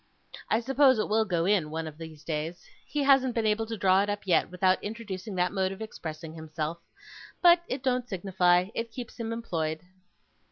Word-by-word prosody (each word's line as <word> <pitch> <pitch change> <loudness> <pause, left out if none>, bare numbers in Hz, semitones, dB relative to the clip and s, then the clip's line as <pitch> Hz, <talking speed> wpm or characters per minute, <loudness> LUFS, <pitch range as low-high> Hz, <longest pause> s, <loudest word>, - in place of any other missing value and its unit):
I 220 - +2
suppose 265 +1 +4
it 215 - 0
will 220 +1 +3
go 170 -4 0
in, 190 -6 +2
one 160 +1 -3
of 155 0 -9
these 160 -2 -10
days. 160 +2 -4 0.2
He 295 -1 -1
hasn't 270 -3 +4
been 230 -2 0
able 215 +1 +1
to 225 0 -4
draw 190 0 +4
it 205 - -1
up 205 -1 -3
yet, 180 - +3
without 185 +1 +1
introducing 210 -2 -6
that 180 0 +1
mode 190 -1 0
of 195 - -8
expressing 160 -7 -7
himself; 160 +1 -5 0.6
but 345 -1 +6
it 255 0 -4
don't 250 -2 0
signify; 180 -1 +2
it 230 0 -4
keeps 245 0 -8
him 230 -1 -3
employed. 160 -9 -2
195 Hz, 195 wpm, -28 LUFS, 165-230 Hz, 0.6 s, but